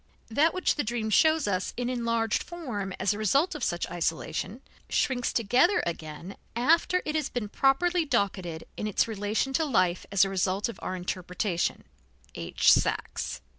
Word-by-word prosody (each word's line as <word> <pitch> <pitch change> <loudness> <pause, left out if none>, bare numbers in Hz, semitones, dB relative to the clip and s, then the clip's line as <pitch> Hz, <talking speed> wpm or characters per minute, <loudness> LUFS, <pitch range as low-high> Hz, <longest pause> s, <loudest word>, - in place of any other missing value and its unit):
That 305 +8 +4
which 370 - +1
the 290 - +1
dream 220 -1 -2
shows 315 +6 +4
us 185 -2 -1
in 245 0 -1
enlarged 230 -3 0
form 245 - -5
as 190 +1 +2
a 205 - -6
result 275 - +2
of - - -6
such - - -1
isolation, - - -3 0.3
shrinks 245 -2 0
together 245 - +3
again 165 +2 -6 0.2
after 330 +8 +3
it 305 - -2
has 310 -3 -1
been 225 -4 -4
properly 335 - +2
docketed 185 - -1
in 215 - -2
its 210 - +1
relation 220 +5 -1
to 320 - +2
life 185 - +1
as 195 -1 +5
a - - -2
result 190 +1 0
of 235 - -8
our 185 - -3
interpretation 180 0 -2 0.5
(H. - - +3
Sachs). - - -1
225 Hz, 165 wpm, -28 LUFS, 190-275 Hz, 0.5 s, as